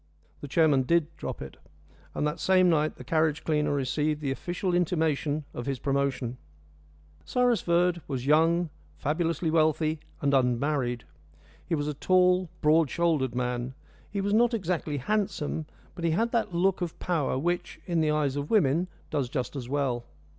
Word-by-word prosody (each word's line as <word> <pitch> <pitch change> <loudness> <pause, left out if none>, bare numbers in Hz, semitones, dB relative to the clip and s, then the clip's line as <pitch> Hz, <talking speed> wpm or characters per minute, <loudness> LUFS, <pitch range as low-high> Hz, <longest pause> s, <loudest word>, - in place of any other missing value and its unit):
The 145 - -7
chairman 150 -2 +3
did 165 +3 +1
drop - - -5
it, 65 - -10 0.6
and - - 0
that 150 +2 -2
same 185 -1 +4
night 155 -1 +1
the - - -10
carriage 155 +2 +1
cleaner 150 -2 +1
received 145 +2 0
the 140 -3 -2
official 175 +7 -2
intimation 155 -4 0
of 120 - -6
his 135 -1 -1
promotion. 135 -2 -1 0.9
Cyrus 245 -2 +2
Verd 175 0 +2
was 130 -3 -3
young, 165 +3 +3 0.3
fabulously 165 +2 -1
wealthy, 155 0 +2 0.2
and 140 -1 +1
unmarried. 125 -1 +1 0.6
He 165 - -1
was 145 -1 -2
a 150 - -1
tall, 180 +3 +3
broad 155 0 +4
shouldered 155 -7 +1
man. 125 +1 -2 0.3
He 200 0 -2
was 200 +1 0
not 235 +2 +4
exactly 175 -7 -2
handsome, 160 -2 -1 0.3
but 175 - -8
he 165 - +2
had 225 +8 +1
that 220 -4 0
look 185 +2 +1
of 175 -2 -3
power 160 -7 -1
which, 175 +5 -2
in 170 -2 0
the 155 - +2
eyes 150 -3 +1
of 145 +1 -3
women, 175 -4 +3 0.2
does 135 -4 -1
just 125 0 -3
as 125 -3 -5
well. 130 -4 -1
155 Hz, 165 wpm, -28 LUFS, 140-175 Hz, 0.9 s, same